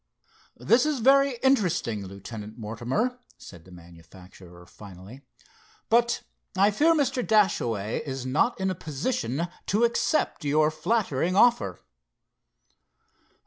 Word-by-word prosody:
"This 230 - +3
is 300 -2 0
very 275 +3 +4
interesting, 180 - +1
Lieutenant 105 +3 -9
Mortimer," 120 - -3 0.2
said 85 -3 -14
the 95 - -16
manufacturer 90 +1 -15
finally, 100 +6 -13 0.7
"but 235 +1 +2 0.3
I 200 +2 +4
fear 315 +10 +3
Mr. 270 -4 0
Dashaway 120 - +1
is 135 -3 -6
not 150 - 0
in 190 0 0
a - - -1
position 160 - -3 0.2
to 210 +4 +1
accept 235 - 0
your 150 +1 +2
flattering 175 - -1
offer." 240 +4 +3
155 Hz, 110 wpm, -26 LUFS, -, 0.7 s, very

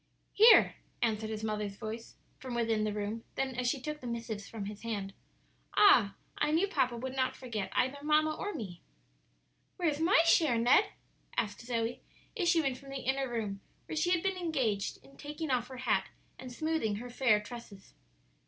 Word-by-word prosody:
"Here," 445 +3 +7 0.3
answered 220 -1 0
his 220 0 -4
mother's 210 -2 -2
voice 220 +3 -7 0.2
from 255 -2 -6
within 225 -2 +1
the 215 - 0
room; 210 +2 -3
then 265 -1 -1
as 250 0 -1
she 275 - -1
took 300 +3 -5
the 250 - -6
missives 225 -3 -5
from 215 -3 -5
his 210 +1 -7
hand, 205 -4 -4 0.6
"Ah, 235 - +6 0.2
I - - +2
knew 330 +6 +3
papa 255 -11 0
would 260 +2 -5
not 260 -1 0
forget 225 -6 -4
either 260 +3 +1
mamma 305 +1 +3
or 410 - -3
me." 200 - -7 1.0
"Where's 315 -5 0
my 340 +5 +5
share, 315 -7 +4
Ned?" 245 - +5 0.5
asked 205 -3 -1
Zoe, 235 0 -2 0.3
issuing 340 - +2
from 275 +2 -12
the 275 - -4
inner 265 +1 0
room, 210 -4 -3 0.2
where - - -6
she 315 +3 +1
had 355 -2 +2
been 385 -1 0
engaged 260 - -1
in 275 - -18
taking 300 0 -5
off 245 -2 +1
her 260 - -9
hat 260 - +1 0.3
and 255 -1 -8
smoothing 310 -6 -1
her 245 +4 -7
fair 235 -4 +3
tresses. 210 -3 -11
245 Hz, 180 wpm, -32 LUFS, 220-300 Hz, 1.0 s, Here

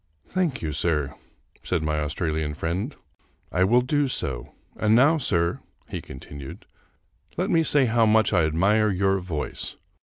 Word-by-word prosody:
" - - -37
Thank 175 - 0
you, 80 - -2
sir," 75 -3 0 0.5
said 85 -4 -1
my 75 0 0
Australian 75 0 -2
friend, 90 - -3 0.3
" - - -39
I 90 - +2
will 120 +6 +4
do 145 +3 +1
so. 65 - -4 0.2
And 110 0 +3
now, 150 +7 +5
sir," 85 - +1 0.3
he - - -4
continued, 70 +1 -10 0.3
" - - -35
let - - 0
me 165 - +4
say 145 -3 +3
how 115 -1 +3
much 110 +1 +3
I 85 - +4
admire 100 +8 +3
your 95 0 +1
voice. 85 -5 -4
95 Hz, 165 wpm, -25 LUFS, 75-115 Hz, 0.5 s, now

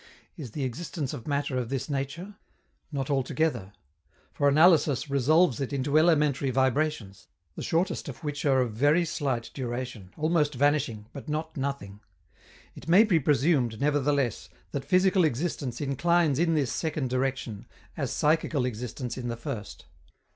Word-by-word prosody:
Is 145 -7 -7
the 145 - -3
existence 140 +2 -4
of 115 - -8
matter 140 -2 -1
of 120 -2 -4
this 135 -1 -3
nature? 150 +8 -4 0.6
Not 140 -1 -3
altogether, 135 -6 -1 0.6
for 145 - +1
analysis 155 -3 +4
resolves 140 +1 +3
it 135 - -3
into 140 +1 -1
elementary 150 -4 +3
vibrations, 130 -5 -1 0.3
the - - -7
shortest 165 -2 -1
of 130 - -10
which 145 -1 -3
are 135 -3 +3
of 120 -4 -2
very 145 +9 +3
slight 135 -7 -2
duration, 120 -6 -5
almost 155 -2 +1
vanishing, 135 -6 +1
but 140 - -8
not 155 +1 -3
nothing. 135 -8 -4 0.7
It - - -12
may 185 +6 +7
be 190 -7 +3
presumed, 140 -5 +2
nevertheless, 140 -4 0 0.2
that 140 - -4
physical 185 0 +3
existence 145 -3 -2
inclines 150 +1 +1
in 165 -1 +2
this 140 -5 0
second 150 -5 -2
direction, 130 -5 -2 0.3
as - - -2
psychical 150 -3 +1
existence 125 +1 -5
in 120 - -4
the 120 -1 -3
first. 120 -4 -7
140 Hz, 145 wpm, -27 LUFS, 125-155 Hz, 0.7 s, may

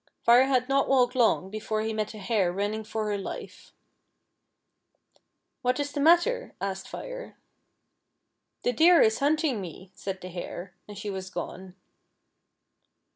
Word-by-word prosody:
Fire 240 +2 +7
had 255 -2 +2
not 275 0 +2
walked 250 -2 +4
long 225 -6 +2
before 215 0 -2
he 220 0 -2
met 215 0 -3
a - - -8
hare 200 -3 +1
running 205 +4 -2
for 215 0 -3
her 205 -1 -1
life. 195 - -8 1.0
" - - -44
What 250 +1 +1
is 285 0 -2
the 290 - -4
matter 345 - +4
t - - -24
" - - -45
asked 190 0 -6
Fire. - - -8 0.6
" - - -48
The - - +2
Deer 330 +7 +6
is 220 0 +2
hunting 290 -5 +1
me," 185 +1 -9
said 190 0 -5
the 185 - -7
Hare, 180 +1 -7
and 205 -1 -10
she 205 0 -4
was 190 -1 -5
gone. 185 +1 -7
220 Hz, 165 wpm, -27 LUFS, 195-275 Hz, 1.0 s, Fire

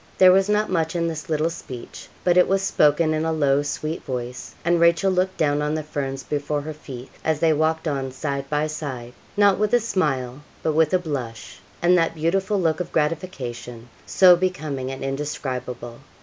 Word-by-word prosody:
There 185 -1 +8
was 190 +2 +3
not 210 0 +1
much 165 -2 0
in 170 -1 0
this 165 +1 -5
little 155 +1 +1
speech, 130 -7 -9 0.2
but 175 -1 +3
it 180 - +5
was 195 0 +1
spoken 155 -3 +3
in 155 0 0
a 160 - 0
low, 145 -3 +2
sweet 155 +3 -3
voice; 125 -1 -6
and 170 0 +3
Rachel 170 +3 +4
looked 185 +1 0
down 145 -1 +1
on 150 +1 0
the 155 - -2
ferns 135 -3 -4
before 145 0 -2
her 155 +2 -6
feet, 135 -4 -10
as 160 -2 0
they 160 -1 +4
walked 160 +2 0
on 135 -3 -2
side 140 0 -4
by 150 0 +1
side, 140 -6 -5 0.2
not 200 -2 +4
with 210 +2 +2
a - - +5
smile, 145 - -1 0.2
but 155 - +1
with 155 0 +3
a - - +6
blush, 130 - -6 0.2
and 175 +1 +5
that 165 0 0
beautiful 190 +5 0
look 160 -2 +1
of 180 - -4
gratification 125 -8 -3 0.2
so 180 -2 +7
becoming 155 -8 -2
and 135 0 -6
indescribable. 130 -4 -4
155 Hz, 190 wpm, -23 LUFS, 135-170 Hz, 0.2 s, There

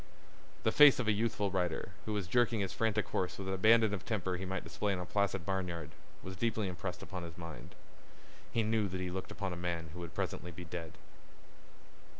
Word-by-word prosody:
The 110 - +3
face 145 +1 +9
of 125 - -1
a - - +5
youthful 105 -2 +1
rider, 90 0 -1 0.2
who 110 - -1
was 105 -3 -1
jerking 115 +3 +2
his 95 - -2
frantic 110 -2 +1
horse 90 -2 -1
with 95 - -5
an 95 - 0
abandon 110 +2 +5
of 95 -4 -3
temper 95 -5 -1
he 95 +1 -4
might 95 +1 -3
display 105 -1 -1
in - - -1
a 90 - -3
placid 95 -2 0
barnyard, 90 -5 -2 0.3
was 95 - -5
impressed 95 -5 -1
deeply - - -11
upon 95 -2 -5
his 85 -1 -8
mind. 85 -6 -8 0.8
He 115 - +2
knew 110 -1 +2
that 95 -1 -4
he 90 -1 -2
looked 95 +1 -4
upon 100 -3 -3
a - - -4
man 85 -2 -3
who 90 - -7
would 85 -1 -7
presently 90 - -2
be 90 +1 -8
dead. 80 -1 -6
95 Hz, 210 wpm, -34 LUFS, 90-105 Hz, 0.8 s, face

